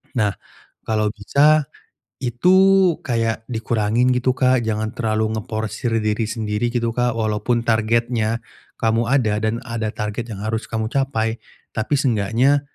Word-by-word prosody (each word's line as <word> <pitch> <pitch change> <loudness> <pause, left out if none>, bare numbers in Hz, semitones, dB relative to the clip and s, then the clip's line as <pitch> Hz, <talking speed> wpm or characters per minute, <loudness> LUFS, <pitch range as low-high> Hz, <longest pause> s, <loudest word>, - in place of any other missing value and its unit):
Nah, 105 -4 +2 0.5
kalau 110 -1 0
bisa, 145 +7 +3 0.5
itu 125 +10 +2 0.5
kayak 115 -3 -1
dikurangin 115 +1 +1
gitu 125 +1 +2
Kak 130 -1 +2
jangan 110 0 -2
terlalu 110 -1 0
ngeforsir 110 +1 -3
diri 110 +1 0
sendiri 110 +1 -1
gitu 115 -1 -1
Kak, 120 -1 0
walaupun 110 +2 0
targetnya 115 0 +1 0.4
kamu 115 +1 +1
ada, 110 -6 +2
dan 110 +1 0
ada 115 -3 -3
target 110 +2 -4
yang 105 0 -6
harus 110 +1 -3
kamu 110 -1 -2
capai. 115 -4 -1 0.3
Tapi 110 +6 -2
seenggaknya 125 +3 +2
115 Hz, 130 wpm, -21 LUFS, 110-120 Hz, 0.5 s, bisa